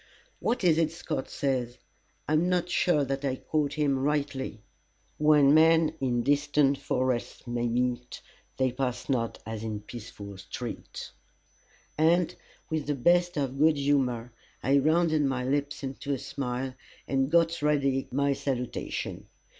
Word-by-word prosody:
What 235 -2 -1
is 165 -3 +4
it 160 -2 +2
Scott 165 -5 -4
says 125 -3 -1 0.5
I 155 - 0
am 165 +4 +3
not 180 -1 +1
sure 155 -6 +3
that 135 +1 -3
I 135 -2 0
quote 150 +1 -1
him 145 -3 +1
rightly 135 -5 -2 0.6
"When 150 -2 +6
men 160 0 +5
in 120 -3 +1
distant 145 0 +2
forests 130 -1 -1
meet, 120 +1 -1 0.4
They 130 -1 +2
pass 125 0 -3
not 115 -4 0
as 110 -1 -5
in 110 -2 -4
peaceful 105 -3 -9
street." - - -7 0.9
And, 170 +2 +3 0.4
with 155 -2 -1
the 145 - 0
best 175 +5 +3
of 135 -1 -2
good 155 0 +5
humour, 130 -4 +1 0.3
I 140 +2 +4
rounded 155 +1 +3
my 135 -3 0
lips 145 +2 -1
into 135 +1 -3
a - - -4
smile, 130 0 -4 0.3
and 135 0 +1
got 170 0 +3
ready 140 -3 +1
my 140 +2 +2
salutation. 130 -3 -4
140 Hz, 140 wpm, -28 LUFS, 125-150 Hz, 0.9 s, When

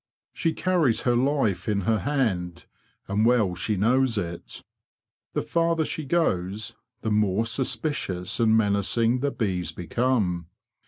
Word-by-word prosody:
She 165 - 0
carries 170 -10 +1
her 120 -1 +2
life 120 -8 +1
in 100 -1 +1
her 110 +3 +1
hand, 100 -12 -1 0.4
and 100 +2 +1
well 115 -6 +3
she 100 +4 -2
knows 120 +3 +2
it. 85 -3 -5 0.7
The - - -1
farther 165 -1 +1
she 155 - -4
goes, 110 - -1 0.3
the 110 - -1
more 105 0 +2
suspicious 115 - -1
and 110 -1 +4
menacing 110 +3 +2
the 140 +2 0
bees 90 - -2
become. 90 -1 -1
110 Hz, 130 wpm, -25 LUFS, 95-130 Hz, 0.7 s, and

